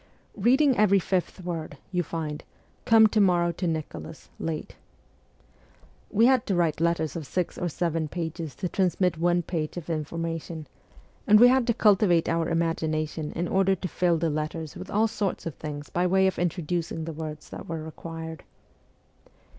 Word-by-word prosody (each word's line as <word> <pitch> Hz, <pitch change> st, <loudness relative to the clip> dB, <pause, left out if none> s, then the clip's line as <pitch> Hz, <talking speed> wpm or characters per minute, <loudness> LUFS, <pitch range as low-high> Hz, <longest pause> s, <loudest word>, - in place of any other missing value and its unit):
Reading 255 Hz, +3 st, +4 dB
each 200 Hz, -3 st, +4 dB
fifth 185 Hz, 0 st, -1 dB
word, 165 Hz, -4 st, -5 dB
you 180 Hz, -1 st, +1 dB
find: 155 Hz, -3 st, -4 dB, 0.2 s
' -, -, -36 dB
Come 225 Hz, -1 st, +7 dB
to 215 Hz, 0 st, +3 dB
morrow 175 Hz, -3 st, +3 dB
to 175 Hz, +2 st, -3 dB
Nicholas, 150 Hz, -, -5 dB
late.' 160 Hz, -2 st, -4 dB, 1.3 s
We 225 Hz, +2 st, +4 dB
had 255 Hz, -2 st, +4 dB
to 195 Hz, -, +1 dB
write 165 Hz, -3 st, +1 dB
letters 170 Hz, -2 st, +1 dB
of 160 Hz, -4 st, -5 dB
six 180 Hz, +3 st, -2 dB
or 175 Hz, -, -2 dB
seven 165 Hz, -1 st, -1 dB
pages 165 Hz, -1 st, -5 dB
to 185 Hz, -, -3 dB
transmit 180 Hz, -2 st, +1 dB
one 175 Hz, +1 st, +2 dB
page 160 Hz, -1 st, -3 dB
of 170 Hz, -1 st, -5 dB
information, 165 Hz, 0 st, -4 dB, 0.6 s
and 210 Hz, 0 st, +7 dB
we 245 Hz, +2 st, +9 dB
had 255 Hz, -1 st, +3 dB
to 235 Hz, -, +2 dB
cultivate 190 Hz, -5 st, +4 dB
our 165 Hz, 0 st, 0 dB
imagination 160 Hz, -2 st, -1 dB
in 175 Hz, +1 st, -2 dB
order 195 Hz, +1 st, +3 dB
to 185 Hz, -, -4 dB
fill 175 Hz, -1 st, +1 dB
the 160 Hz, 0 st, 0 dB
letters 155 Hz, +1 st, -4 dB
with 185 Hz, +1 st, -8 dB
all 215 Hz, +2 st, +2 dB
sorts 210 Hz, -3 st, -3 dB
of 165 Hz, -, -3 dB
things 145 Hz, 0 st, -7 dB
by 175 Hz, +1 st, +1 dB
way 190 Hz, +1 st, +3 dB
of 190 Hz, -, 0 dB
introducing 170 Hz, -1 st, -2 dB
the 165 Hz, -, -5 dB
words 155 Hz, -1 st, -7 dB
that -, -, -8 dB
were 165 Hz, -1 st, -4 dB
required. 160 Hz, 0 st, -7 dB
170 Hz, 170 wpm, -26 LUFS, 160-190 Hz, 1.3 s, we